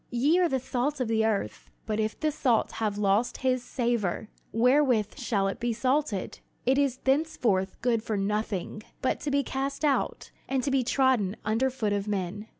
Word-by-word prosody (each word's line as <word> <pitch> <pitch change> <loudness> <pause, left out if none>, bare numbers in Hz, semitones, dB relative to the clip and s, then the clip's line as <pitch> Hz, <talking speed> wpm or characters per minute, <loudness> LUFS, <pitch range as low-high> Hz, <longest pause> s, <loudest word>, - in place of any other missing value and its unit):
"Ye 280 +9 +3
are 355 -2 +3
the 265 - 0
salt 265 +3 -2
of 255 - 0
the 220 0 +2
earth: 210 -3 -2 0.2
but 215 -1 -2
if 215 0 -1
the 310 -1 +1
salt 250 -6 +1
have 210 -2 -2
lost 205 +3 +1
his 255 -1 +2
savor, 235 -6 -1 0.2
wherewith 245 -3 +3
shall 205 -5 0
it 195 - -3
be 240 0 0
salted? 255 -4 -1 0.3
it 265 +3 +3
is 275 -3 +1
thenceforth 265 -10 +1
good 235 -3 +2
for 215 -2 -2
nothing, 210 0 -2 0.2
but 260 - +1
to 295 - -3
be 280 0 +2
cast 275 +3 -2
out, 285 -2 0 0.2
and 265 -1 0
to 275 - 0
be 265 -1 +2
trodden 245 -6 +2
under 225 +5 +2
foot 220 -5 -1
of 200 0 -2
men. 205 +1 -3
240 Hz, 185 wpm, -28 LUFS, 210-265 Hz, 0.3 s, Ye